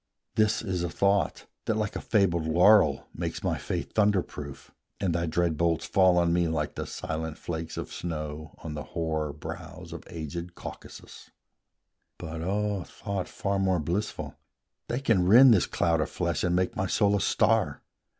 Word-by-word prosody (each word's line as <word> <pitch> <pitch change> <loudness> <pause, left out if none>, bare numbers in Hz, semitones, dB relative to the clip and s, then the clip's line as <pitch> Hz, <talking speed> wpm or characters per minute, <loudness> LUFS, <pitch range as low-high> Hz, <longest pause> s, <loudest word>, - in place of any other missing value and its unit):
This 110 0 +2
is 95 -5 -2
a 85 - -1
thought, 100 +3 +1 0.2
that, 110 - 0
like 105 -1 -2
a - - -3
fabled 85 -7 +2
laurel, 85 -2 +5
Makes - - -4
my - - 0
faith - - -4
thunder 105 -3 +3
proof; 70 -2 -9 0.3
and 95 -4 0
thy 85 0 0
dread 85 -1 0
bolts 85 -1 +1
Fall 95 -2 +4
on 85 -1 +3
me 85 -1 +2
like 75 -2 -1
the - - -5
silent 80 0 -4
flakes 80 -1 -5
of - - -5
snow 75 -2 -5
On 80 -2 -5
the 75 - -4 0.2
hoar 80 -2 -1
brows 75 +1 -8
of - - -8
aged 85 +2 -6
Caucasus: - - -10 0.9
But, 80 0 -6
O 100 +1 -1
thought 100 +2 -5
far 100 0 -1
more 95 -2 +2
blissful, 85 +7 -3 0.5
they 120 +3 -2
can 100 -9 +2
rend 120 +5 +9
This 95 - +3
cloud 85 -2 +1
of - - -1
flesh, 85 -3 -1
and 90 0 +2
make 90 0 0
my 95 - -1
soul 100 +1 +3
a 100 - +1
star! - - +2
85 Hz, 175 wpm, -28 LUFS, 80-100 Hz, 0.9 s, rend